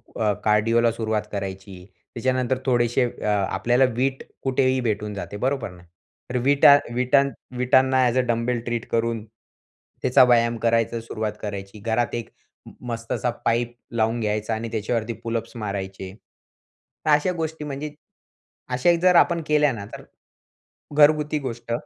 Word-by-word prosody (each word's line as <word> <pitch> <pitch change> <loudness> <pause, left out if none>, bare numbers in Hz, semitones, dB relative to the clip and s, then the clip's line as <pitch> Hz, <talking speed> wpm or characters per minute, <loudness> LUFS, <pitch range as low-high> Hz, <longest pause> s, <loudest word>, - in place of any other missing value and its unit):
अ, 105 -2 +1
कार्डिओला 115 +2 +3
सुरुवात 110 -2 -1
करायची. 95 -2 -6 0.3
त्याच्यानंतर 130 +1 0
थोडेशे 120 0 +2
अ, - - -9
आपल्याला 110 +5 +2
वीट 135 +2 -1 0.2
कुठेही 130 0 +2
भेटून 105 -3 -2
जाते. 100 0 -6
बरोबर, 125 -6 -2 0.5
तर 125 - -1
वीटा 140 +1 +7 0.2
वीटा 125 +2 +3 0.4
वीटांना 130 +1 +3
ॲज 120 +1 +1
अ 130 - +5
डंबेल 120 +1 0
ट्रीट 120 -1 -3
करून 115 -1 0 0.8
त्याचा 130 +1 +5
व्यायाम 115 -1 +3
करायचा 115 0 +1
सुरुवात 110 -2 -4
करायची. 100 0 -6
घरात 115 +3 -1
एक 120 -1 -5 0.6
मस्तसा 115 +1 -2 0.2
पाईप 120 +1 0 0.2
लावून 115 +1 +1
घ्यायचा 105 0 -1
आणि 115 +1 -5
त्याच्यावरती 115 +1 -2
पुलअप्स 115 0 -4
मारायचे. 95 -3 -5 0.9
तर 155 - +2
अशा 150 +5 +3
गोष्टी 160 -1 -4
म्हणजे 145 +1 -5 0.8
अशा 150 +8 +3
जर 180 0 +5
आपण 170 0 +4
केल्या 150 -2 +3
ना, 100 -4 -6
तर - - -10 0.9
घरगुती 150 0 +4
गोष्ट 120 -4 -6
115 Hz, 135 wpm, -23 LUFS, 110-130 Hz, 0.9 s, वीटा